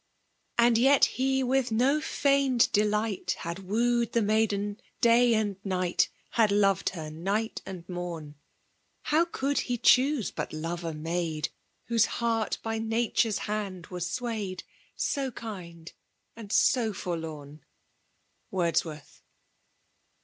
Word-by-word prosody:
And 235 -1 +5
yet 270 +3 +6
he 265 +1 0
with 260 -1 +1
no 265 +7 +2
feigned 275 -5 +2
delight 210 0 0
H - - -7
ad 170 +2 -4
wooed 235 +4 0
the 235 - +3
nudden 205 -1 0 0.2
day 235 0 +5
and 205 -3 -1
aight«. 185 -2 +1 0.2
Had 220 -3 +3
loved 195 -2 +3
her 155 -2 -6
night 200 +8 -2
aud 185 -3 -7
niorn. 175 -4 -6 0.7
How 315 +3 +3
could 285 -4 -1
he 245 - 0
choose 255 - +3
hut - - -4
lore 165 +2 -3
a - - -5
maid 160 0 -2 0.4
WhoM 230 -2 +3
heart 230 -2 -1
by 225 0 -2
Nature's 225 -1 +1
hand 200 -5 -3
was 175 -1 -2
twayed, 220 -7 -4 0.2
— - - -38
So 275 -2 -1
kind, 180 -8 -9 0.4
and 220 -3 -9
so 225 -3 +3
forlorn? 155 -5 -6 0.9
WoBoawoRTB. 165 -4 -2
210 Hz, 125 wpm, -28 LUFS, 175-235 Hz, 0.9 s, yet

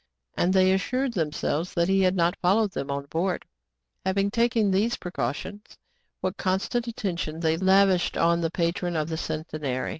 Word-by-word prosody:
^ - - -43 0.2
— - - -57
and 175 - +2
they 190 0 +4
assured 250 +7 0
themselves 160 0 -2
that 170 0 +2
he 195 0 +3
had 185 0 +3
not 175 +1 +2
followed 200 +3 +2
them 140 -6 -4
on 140 0 -3
board. 170 +5 -2 0.6
Having 195 +1 +1
taken 230 -3 +2
these 210 +5 +1
precautions, 175 - -5 0.4
what 185 0 -2
constant 200 +6 -1
attention 170 -8 -3
they 160 -1 +2
lavished 190 0 +3
on 170 0 +3
the 165 - 0
patron 175 +1 -1
of 155 0 -1
the 160 - -3
Centenary 155 -5 -3
180 Hz, 175 wpm, -26 LUFS, 160-195 Hz, 0.6 s, they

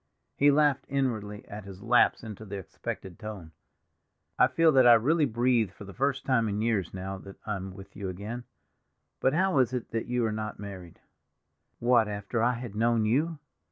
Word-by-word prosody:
He 145 - +5
laughed 145 -1 +3
inwardly 110 -7 -2
at 105 +1 -8
his 95 0 -11
lapse 120 0 +4
into 110 -1 -8
the 100 -1 -6
expected 95 -1 -7
tone. 100 -7 -8 0.9
"I - - +7
feel 165 -1 +4
that 130 -3 +6
I 120 - +10
really 150 +8 +3
breathe 120 -2 +2
for 95 - -12
the 100 0 -10
first 135 0 -1
time 115 -5 +2
in 100 0 -2
years, 110 -5 0
now 95 +1 -5
that 95 +1 -11
I'm 95 -3 -4
with 95 0 -12
you 100 -2 -4
again. 105 +7 -6 0.7
But 130 - +2
how 185 -3 +2
is 130 -1 +2
it 125 -2 -4
that 115 0 -2
you 125 -1 0
are 110 - 0
not 110 0 -4
married?" 95 -4 -9 0.8
"What, 120 -2 +3
after 105 +2 -3
I 120 +2 +3
had 120 -3 -6
known 115 +1 +2
you?" 150 +9 +1
110 Hz, 190 wpm, -28 LUFS, 100-125 Hz, 0.9 s, I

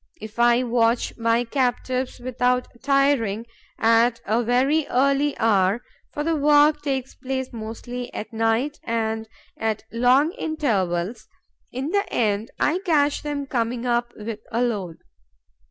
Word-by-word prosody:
If 215 +2 -9
I 240 +1 +4
watch 235 -1 +1
my 230 0 +1
captives, 255 0 -1
without 250 0 0
tiring, 275 -6 +2 0.3
at 230 +1 +3
a 220 +4 +1
very 265 +6 +2
early 275 +2 +2
hour 205 0 +2 0.3
for 295 - -3
the 330 +1 +1
work 295 0 +4
takes 265 -3 -3
place 260 -1 -4
mostly 235 +2 -6
at 220 - -7
night 225 +6 0
and 225 -1 -2 0.3
at 220 -1 -2
long 255 +7 +3
intervals 215 - -1 0.4
in 270 +5 -3
the 400 0 0
end 215 0 0
I 325 +5 +2
catch 300 -6 +1
them 290 -1 -3
coming 240 -2 -2
up 240 0 0
with 215 0 -6
a 235 +2 +1
load. 195 -9 -2
245 Hz, 135 wpm, -23 LUFS, 225-275 Hz, 0.4 s, I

